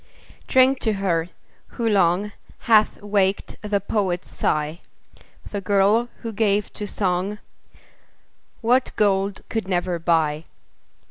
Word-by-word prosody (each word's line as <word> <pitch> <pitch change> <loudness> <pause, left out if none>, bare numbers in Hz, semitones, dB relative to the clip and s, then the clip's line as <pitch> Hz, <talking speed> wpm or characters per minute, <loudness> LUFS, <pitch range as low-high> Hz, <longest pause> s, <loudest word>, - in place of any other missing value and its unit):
Drink 260 0 +4
to 220 - 0
her, 175 -4 -1 0.5
who 235 - 0
long, 195 0 +2 0.3
Hath 215 -2 +3
waked 200 -1 0
the 210 -1 0
poet's 190 -3 -2
sigh. 155 +2 -1 0.7
The 205 - -3
girl, 205 +5 +2
who 230 -1 -4
gave 210 -1 0
to 210 - -5
song 190 +1 -1 1.2
What 250 +3 +2
gold 195 -1 +1
could 225 -4 -3
never 175 -2 -1
buy. 160 -2 +1
200 Hz, 115 wpm, -23 LUFS, 180-215 Hz, 1.2 s, Drink